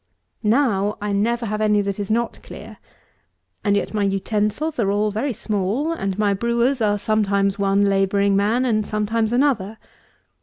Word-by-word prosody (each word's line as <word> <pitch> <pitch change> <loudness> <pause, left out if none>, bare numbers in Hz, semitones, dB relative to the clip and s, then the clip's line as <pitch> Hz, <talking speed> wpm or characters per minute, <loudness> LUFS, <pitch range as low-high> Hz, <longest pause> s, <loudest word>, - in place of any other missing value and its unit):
Now 210 -3 +1
I 205 0 -3
never 230 +4 0
have 215 0 -3
any 210 -1 +3
that 200 0 -3
is 200 - -4
not 235 +2 -1
clear. - - -11 0.9
And 205 -1 +2
yet 205 - -2
my 210 - 0
utensils 210 +9 -1
are 200 -4 +1
all 210 +1 +1
very 235 +7 -2
small; 215 - -2
and 195 - -3
my 205 -1 +2
brewers 235 +5 0
are 205 -1 +2
sometimes 200 -1 0
one 200 0 +2
labouring 200 0 +2
man, 215 +6 +1
and 215 -3 +1
sometimes 215 +2 -1
another. 240 -5 +1
210 Hz, 160 wpm, -21 LUFS, 200-230 Hz, 0.9 s, any